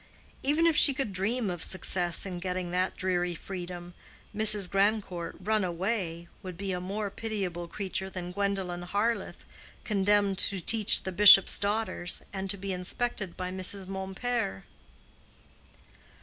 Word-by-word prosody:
—even 300 Hz, +4 st, +1 dB
if 330 Hz, -2 st, +3 dB
she 280 Hz, -2 st, +5 dB
could 260 Hz, -7 st, -3 dB
dream 205 Hz, +3 st, -2 dB
of 175 Hz, -2 st, -6 dB
success 180 Hz, -2 st, 0 dB
in 180 Hz, -2 st, -6 dB
getting 180 Hz, -1 st, -4 dB
that 180 Hz, +1 st, -2 dB
dreary 180 Hz, -1 st, -2 dB
freedom. 175 Hz, -1 st, -8 dB, 0.4 s
Mrs. 210 Hz, -2 st, +8 dB
Grandcourt 195 Hz, -3 st, -1 dB
"run 215 Hz, +2 st, -1 dB
away" 175 Hz, -1 st, -3 dB
would 185 Hz, -2 st, -9 dB
be 195 Hz, 0 st, -4 dB
a 180 Hz, -1 st, -4 dB
more 200 Hz, +2 st, -5 dB
pitiable 195 Hz, -6 st, -5 dB
creature 190 Hz, +1 st, -4 dB
than 180 Hz, -2 st, -7 dB
Gwendolen 195 Hz, -2 st, -3 dB
Harleth 205 Hz, +6 st, -3 dB, 0.4 s
condemned 200 Hz, -1 st, +1 dB
to 195 Hz, -, +2 dB
teach 215 Hz, +4 st, +5 dB
the 190 Hz, -, -5 dB
bishop's 195 Hz, 0 st, +7 dB
daughters, 205 Hz, -3 st, +1 dB
and 195 Hz, 0 st, -5 dB
to 200 Hz, -, -1 dB
be 195 Hz, 0 st, -5 dB
inspected 190 Hz, +1 st, -3 dB
by 180 Hz, 0 st, -5 dB
Mrs. 190 Hz, +1 st, 0 dB
Mompert. 190 Hz, -, -4 dB
190 Hz, 140 wpm, -28 LUFS, 180-205 Hz, 0.4 s, Mrs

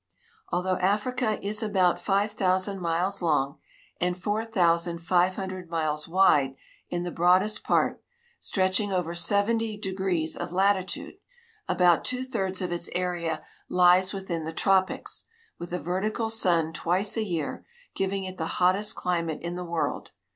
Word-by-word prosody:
Although 180 Hz, +1 st, 0 dB
Africa 215 Hz, +4 st, 0 dB
is 210 Hz, +1 st, +1 dB
about 190 Hz, -5 st, +2 dB
five 200 Hz, +1 st, +1 dB
thousand 190 Hz, -1 st, 0 dB
miles 180 Hz, +3 st, 0 dB
long 150 Hz, -3 st, +1 dB, 0.4 s
and 180 Hz, +1 st, -1 dB
four 210 Hz, +4 st, -1 dB
thousand 170 Hz, -6 st, +1 dB
five 180 Hz, +1 st, +3 dB
hundred 185 Hz, -3 st, -6 dB
miles 155 Hz, -2 st, -2 dB
wide 150 Hz, -7 st, +4 dB, 0.3 s
in 175 Hz, 0 st, -2 dB
the 175 Hz, -, -4 dB
broadest 185 Hz, +5 st, +3 dB
part, -, -, +1 dB, 0.4 s
stretch 185 Hz, -1 st, +1 dB
ing 205 Hz, -2 st, -2 dB
over 180 Hz, -3 st, -1 dB
seventy 210 Hz, +5 st, +2 dB
degrees 190 Hz, -5 st, -1 dB
of -, -, -5 dB
latitude, 190 Hz, 0 st, 0 dB, 0.5 s
about 175 Hz, -2 st, +4 dB
two 255 Hz, 0 st, -1 dB
thirds 195 Hz, -7 st, -2 dB
of 180 Hz, -, -3 dB
its 175 Hz, -, -3 dB
area 175 Hz, -2 st, -2 dB, 0.3 s
lies 180 Hz, +1 st, +5 dB
within 190 Hz, -5 st, -4 dB
the 160 Hz, +1 st, -5 dB
tropics, 190 Hz, +2 st, +1 dB, 0.3 s
with 175 Hz, 0 st, -7 dB
a 180 Hz, -, -1 dB
vertical 215 Hz, +6 st, -2 dB
sun 170 Hz, -7 st, +2 dB
twice 185 Hz, +6 st, 0 dB
a 225 Hz, -, 0 dB
year, 170 Hz, -8 st, -3 dB, 0.3 s
giving 195 Hz, 0 st, -1 dB
it 185 Hz, 0 st, -7 dB
the 160 Hz, -, -1 dB
hottest 185 Hz, +4 st, +2 dB
climate 170 Hz, -3 st, -2 dB
in 170 Hz, 0 st, -3 dB
the 180 Hz, -, -4 dB
world. 170 Hz, -1 st, -2 dB
185 Hz, 150 wpm, -27 LUFS, 170-200 Hz, 0.5 s, lies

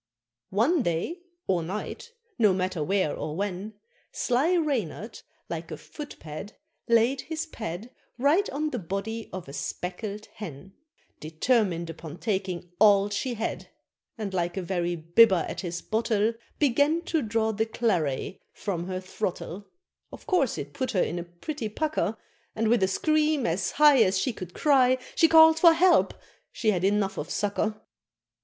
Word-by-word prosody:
One 255 Hz, -, +2 dB
day, 175 Hz, -, -2 dB, 0.3 s
or 180 Hz, -3 st, +1 dB
night, 210 Hz, -, -6 dB, 0.3 s
no 210 Hz, -5 st, +5 dB
matter 185 Hz, -4 st, -1 dB
where 185 Hz, -2 st, +1 dB
or 150 Hz, -, -4 dB
when, 200 Hz, +2 st, -4 dB, 0.4 s
Sly 285 Hz, +9 st, +1 dB
Reynard, 230 Hz, -, -2 dB, 0.3 s
like -, -, -5 dB
a -, -, -6 dB
foot 295 Hz, -2 st, -9 dB
pad, 160 Hz, +7 st, -8 dB, 0.3 s
laid 235 Hz, +3 st, +3 dB
his 320 Hz, 0 st, -4 dB
pad 220 Hz, -, -6 dB, 0.3 s
Right 295 Hz, +11 st, +3 dB
on 300 Hz, +2 st, -2 dB
the 245 Hz, -, -2 dB
body 200 Hz, +5 st, -4 dB
of 185 Hz, -4 st, -7 dB
a 140 Hz, -, -9 dB
speckled 200 Hz, +8 st, -5 dB
Hen, 190 Hz, -1 st, -9 dB, 0.5 s
Determined 170 Hz, +1 st, 0 dB
upon 165 Hz, 0 st, -9 dB
taking 190 Hz, -5 st, -3 dB
all 205 Hz, -1 st, +6 dB
she 240 Hz, +4 st, -2 dB
had; 220 Hz, +1 st, -4 dB, 0.5 s
And 210 Hz, -3 st, -4 dB
like 175 Hz, 0 st, -1 dB
a 190 Hz, -, -2 dB
very 175 Hz, -1 st, -1 dB
bibber 175 Hz, +3 st, +4 dB
at -, -, -5 dB
his 175 Hz, -2 st, -5 dB
bottle, 220 Hz, 0 st, +1 dB, 0.2 s
Began 295 Hz, +4 st, +2 dB
to 325 Hz, -3 st, 0 dB
draw 220 Hz, -1 st, 0 dB
the 220 Hz, +1 st, -1 dB
claret 185 Hz, -, -1 dB
from 175 Hz, -4 st, -4 dB
her 185 Hz, -1 st, -3 dB
throttle; 185 Hz, 0 st, -5 dB, 0.4 s
Of -, -, -11 dB
course 360 Hz, -, +1 dB
it -, -, -6 dB
put 260 Hz, -3 st, -2 dB
her 185 Hz, -, +3 dB
in 175 Hz, -, -3 dB
a -, -, -4 dB
pretty 215 Hz, -, -6 dB
pucker, 225 Hz, -, -1 dB, 0.4 s
And 220 Hz, 0 st, +1 dB
with 235 Hz, -1 st, +3 dB
a 190 Hz, -, +4 dB
scream 305 Hz, +6 st, +1 dB
as 175 Hz, +2 st, 0 dB
high 295 Hz, -4 st, +6 dB
As 190 Hz, -3 st, +3 dB
she 255 Hz, +6 st, 0 dB
could 180 Hz, -4 st, -9 dB
cry, 260 Hz, -3 st, +4 dB, 0.2 s
She 330 Hz, -, +5 dB
call'd 320 Hz, 0 st, +7 dB
for 335 Hz, -1 st, +8 dB
help 350 Hz, +2 st, +4 dB, 0.4 s
she 220 Hz, -, +1 dB
had 180 Hz, -3 st, -1 dB
enough 200 Hz, 0 st, +1 dB
of 150 Hz, -, -5 dB
sucker. 210 Hz, +1 st, -1 dB
210 Hz, 160 wpm, -27 LUFS, 180-260 Hz, 0.5 s, for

